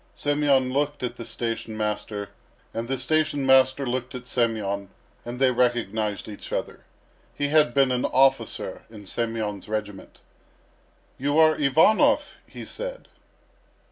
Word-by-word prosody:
Semyon 145 -3 +1
looked 145 0 -1
at 125 - -3
the 115 - -8
station 115 -1 -4
master 105 -1 -3 0.4
and 115 +1 -4
the 135 +1 -1
station 150 +1 0
master 130 +1 +4
looked 125 0 -3
at 125 0 -7
Semyon, 105 -5 -1 0.3
and 120 +1 -6
they 130 -1 +4
recognised 115 -4 0
each 105 -2 -9
other. - - -4 0.5
He 145 0 -1
had 150 -5 +3
been 135 -2 +4
an 125 0 0
officer 135 0 +1
in 105 -2 -12
Semyon's 110 -2 -3
regiment. 105 -2 -5 1.0
"You 145 +3 0
are 155 -1 +6
Ivanov?" 155 +9 +3
he - - -9
said. - - -7
125 Hz, 135 wpm, -25 LUFS, 110-140 Hz, 1.0 s, are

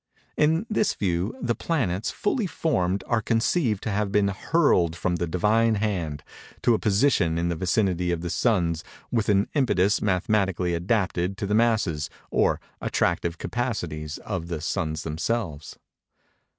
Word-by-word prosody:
In 160 +6 +2
this 215 -1 +1
view, 90 +4 -1
the 120 -1 +1
planets, 115 - -1
fully 210 0 -1
formed, 95 - 0
are 120 -2 +1
conceived 115 - +1
to 110 - -2
have 100 0 -1
been 100 -1 +3
hurled 95 - +2
from 90 0 -1
the 85 +1 -2
Divine 110 +7 +2
hand, 90 -8 -2 0.4
to 120 - +5
a 110 - +1
position 100 -6 +2
in 85 +1 0
the 85 - -1
vicinity 90 0 +1
of 85 -1 -2
the 85 -1 -3
suns, 85 -9 +1 0.3
with 115 -3 0
an 100 0 +3
impetus 105 - +2
mathematically 95 -2 +1
adapted 90 0 0
to 105 - -3
the 100 - -1
masses, 105 -10 +1 0.2
or - - +2 0.2
attractive 85 -1 0
capacities, 85 -13 -3
of 90 -5 -5
the 85 -2 -3
suns 80 -1 -2
themselves. 80 -1 -3
95 Hz, 150 wpm, -25 LUFS, 85-115 Hz, 0.4 s, to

